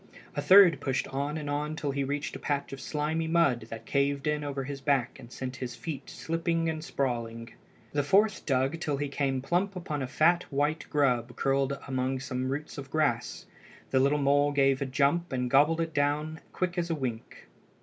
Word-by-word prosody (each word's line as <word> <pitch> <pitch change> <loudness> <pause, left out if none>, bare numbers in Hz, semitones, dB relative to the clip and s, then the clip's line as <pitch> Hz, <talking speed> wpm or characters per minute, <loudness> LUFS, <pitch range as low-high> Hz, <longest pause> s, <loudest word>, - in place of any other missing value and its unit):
A - - -1
third 185 -6 +7
pushed 135 -2 -1
on 140 +3 -2
and 150 -2 -5
on 150 +2 -2
till 145 -3 -2
he 140 0 -1
reached 145 +2 -3
a - - -6
patch 140 -1 -2
of 135 - -7
slimy 155 +2 -1
mud 140 -9 +2
that 115 0 -8
caved 140 +1 0
in 150 -1 0
over 140 -2 -3
his 140 0 -6
back 135 -3 0
and 120 -2 -12
sent 130 0 -5
his 120 -2 -5
feet 155 +4 -6
slipping 165 -1 -1
and 160 -1 -2
sprawling. 115 -6 -3 0.4
The 145 - +1
fourth 195 +7 +3
dug 135 +3 +1
till 150 -4 -1
he 145 +1 -2
came 135 -2 -1
plump 185 +6 0
upon 155 -5 -4
a 130 - -2
fat 170 +6 +2
white 145 +3 0
grub 125 -5 +1
curled 135 +1 +1
among 130 0 -1
some 130 -1 -3
roots 150 +1 -5
of 135 -1 -8
grass. 140 -6 -1 0.5
The 130 - +4
little 140 +3 +3
mole 145 0 +3
gave 135 -1 +3
a 140 - -1
jump 145 +6 +1
and 125 -1 -1
gobbled 150 +4 +4
it 165 -1 -3
down 150 +2 0
quick 180 -1 -1
as 170 0 -2
a 165 - 0
wink. 125 -6 -5
140 Hz, 200 wpm, -29 LUFS, 135-155 Hz, 0.5 s, third